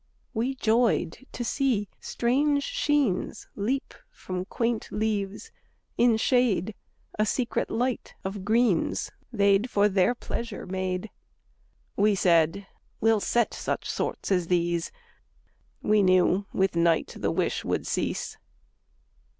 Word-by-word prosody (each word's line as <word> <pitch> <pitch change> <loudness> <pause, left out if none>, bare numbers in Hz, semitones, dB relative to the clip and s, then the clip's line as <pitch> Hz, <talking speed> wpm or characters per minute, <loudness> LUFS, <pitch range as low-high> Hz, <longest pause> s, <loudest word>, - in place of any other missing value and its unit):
We 245 +4 -1
joyed 230 - +1
to 240 - -4
see 235 -5 0
strange 285 +4 +1
sheens 290 - 0
Leap 255 +7 -2 0.2
from 185 - -5
quaint 230 +2 -2
leaves 210 - -2 0.4
in 235 -2 +4
shade; 220 -5 +2 0.5
A 215 - +4
secret 240 +1 -1
light 245 +2 -2
of 195 0 -4
greens 220 -3 +1 0.2
They'd 200 +1 +3
for 205 -2 +3
their 195 +4 +2
pleasure 235 -1 -5
made. 185 +2 -3 0.8
We 205 0 +3
said: 170 +1 +3 0.3
"We'll 225 -1 +3
set 235 +2 +1
such - - -3
sorts - - -3
as 180 -3 +2
these!" 170 -1 0 0.9
—We 210 0 +4
knew 185 +1 +3
with 190 -2 +1
night 170 -1 +2
the - - 0
wish - - -1
would - - -1
cease. - - -2
210 Hz, 120 wpm, -27 LUFS, 185-240 Hz, 0.9 s, in